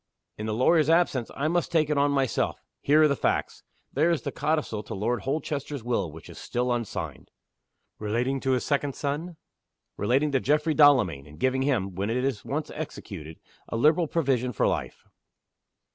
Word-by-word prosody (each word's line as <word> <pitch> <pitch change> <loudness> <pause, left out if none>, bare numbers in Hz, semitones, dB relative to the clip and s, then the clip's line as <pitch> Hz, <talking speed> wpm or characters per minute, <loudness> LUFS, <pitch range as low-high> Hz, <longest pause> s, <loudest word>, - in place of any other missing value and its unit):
In 105 - -5
the 110 - -1
lawyer's 155 +5 +4
absence, 165 -7 +2
I 145 - 0
must 175 +1 0
take 160 -3 +3
it - - +2
on 140 0 +3
myself. 135 -3 0 0.2
Here 150 +2 +5
are - - +7
the 140 - +1
facts. - - -1 0.3
There 155 +5 +3
is 170 -3 0
the 140 - -3
codicil 150 -8 -1
to - - -7
Lord 110 +3 -1
Holchester's 140 -1 -3
Will 115 -9 -1
which 80 +1 -12
is - - -11
still 125 0 -1
unsigned." 95 - -5 0.7
"Relating 120 +6 -1
to 130 0 0
his 125 - 0
second 140 -1 0
son?" 155 +4 -3 0.6
"Relating 135 +8 +2
to 135 - +2
Geoffrey 150 +4 +1
Delamayn, 120 - +4
and 75 +1 -14
giving 130 0 +1
him 115 -9 0
(when 100 +4 -2
it 115 - 0
is 135 -7 -2
once 150 +2 -3
executed) 100 - -7 0.3
a 115 - -2
liberal 155 +7 +4
provision 130 -6 0
for - - +1
life." - - -2
135 Hz, 180 wpm, -27 LUFS, 115-150 Hz, 0.7 s, are